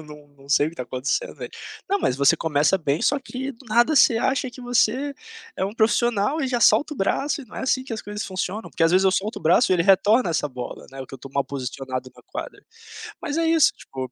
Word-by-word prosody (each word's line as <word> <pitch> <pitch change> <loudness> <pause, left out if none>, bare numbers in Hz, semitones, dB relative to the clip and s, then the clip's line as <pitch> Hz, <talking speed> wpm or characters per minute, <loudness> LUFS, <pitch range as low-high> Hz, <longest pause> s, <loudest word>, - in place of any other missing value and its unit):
eu - - -11
num 150 -1 -13
num 140 -1 -20
sei 145 +1 +4
o - - -8
que 170 - -17
tá 125 - -4
acontecendo 130 - -2
velho. - - -8 0.4
'Não 400 +1 +1
mas 125 - 0
você 140 0 +4
começa 155 +4 +2
bem, 150 -3 -1
só 285 - +2
que 265 0 -6
do 260 0 -15
nada 240 +7 +3
você 235 - +6
acha 260 +3 0
que 250 - -12
você 245 +3 +1 0.4
é - - -1
um 200 +2 -4
profissional 235 +4 +1
e 275 - 0
já 245 -2 -1
solta 300 +5 +4
o - - -13
braço 280 +8 -1
e - - -12
não 215 - -14
é - - -4
assim 260 0 +1
que 260 - -8
as 220 - -3
coisas 210 +1 -6
funcionam'". 190 +3 -4
Porque 165 - +1
as 165 - +3
vezes 185 +1 +4
eu 190 - +5
solto 205 +4 -2
o - - -17
braço 170 +3 +4
e - - +5
ele 170 - +2
retorna 200 +3 +4
essa 155 -2 0
bola, 125 -2 -8
né, 135 - -8
ou 130 - -7
que - - -11
eu - - -10
tô 135 - -10
mal 140 +1 0
posicionado 130 -1 -5
na - - -18
quadra. - - -8 0.6
Mas 320 -2 -3
é 330 - +1
isso 325 -3 +5
tipo, 130 -2 -7
200 Hz, 270 wpm, -23 LUFS, -, 0.6 s, você